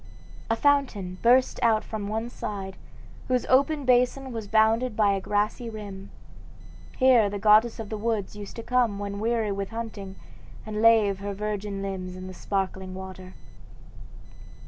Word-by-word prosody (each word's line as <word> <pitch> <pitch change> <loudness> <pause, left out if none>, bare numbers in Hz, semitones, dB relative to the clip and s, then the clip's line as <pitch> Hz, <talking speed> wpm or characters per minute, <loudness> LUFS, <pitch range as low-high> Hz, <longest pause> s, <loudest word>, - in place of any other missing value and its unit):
A 225 - +2
fountain 230 -10 +1
burst 250 +2 +4
out 220 -2 +3
from 215 -2 -5
one 220 +2 -2
side, 195 -4 -5 0.5
whose 255 -1 +1
open 280 +2 +2
basin 250 +2 +2
was 225 -3 -5
bounded 220 +3 +2
by 210 -2 +3
a 195 - -2
grassy 210 +4 -1
rim. 200 -3 -8 0.9
Here 250 -5 +5
the 205 - -4
goddess 215 +3 +4
of 220 -2 -6
the 215 - -4
woods 215 -3 -2
used 205 -1 -9
to 230 - -6
come 245 -5 +1
when 200 0 -5
weary 225 -1 0
with 195 0 -3
hunting 220 -4 -6 0.5
and 215 0 -3
lave 220 -4 +5
her 200 0 -4
virgin 205 -1 -4
limbs 185 -2 -5
in 185 0 -8
the 185 - -8
sparkling 190 0 -3
water. 185 0 -9
210 Hz, 155 wpm, -26 LUFS, 195-230 Hz, 0.9 s, Here